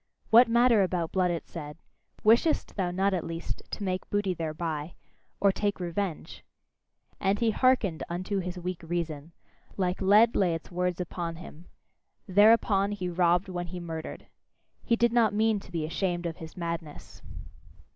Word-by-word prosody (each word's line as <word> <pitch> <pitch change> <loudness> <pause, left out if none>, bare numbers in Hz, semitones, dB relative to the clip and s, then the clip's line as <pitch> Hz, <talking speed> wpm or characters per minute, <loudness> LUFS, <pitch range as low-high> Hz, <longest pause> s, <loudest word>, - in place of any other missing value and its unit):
"What 235 +2 +8
matter 235 -1 +4
about 180 -3 -1
blood!" 185 -1 +2
it 170 -1 -3
said; 150 -3 -8 0.5
"wishest 235 +9 +3
thou 185 -3 0
not, 190 +2 +1
at 180 - -1
least, 165 0 -5
to 210 - -5
make 185 -1 -3
booty 205 -2 0
thereby? 160 -1 -4 0.4
Or 200 0 +4
take 205 +1 -2
revenge?" 175 -1 -4 0.8
And 195 +1 +1
he 225 0 +2
hearkened 225 -9 +2
unto 185 +4 -2
his 180 0 -5
weak 180 0 -5
reason: 165 -2 -4 0.5
like 185 -1 -1
lead 210 +4 +5
lay 180 -4 +2
its 165 - -9
words 180 0 -1
upon 170 -1 -4
him 165 0 -12 0.6
thereupon 205 0 +4
he 185 -3 -3
robbed 175 +1 +2
when 175 -1 -4
he 180 +1 -6
murdered. 165 -2 -7 0.6
He 230 - +2
did 235 0 +2
not 225 -4 +3
mean 220 0 +2
to 190 - -15
be 165 -3 -2
ashamed 175 +1 -2
of 165 -2 -4
his 160 +1 -10
madness. 170 -3 -6
180 Hz, 160 wpm, -28 LUFS, 170-205 Hz, 0.8 s, What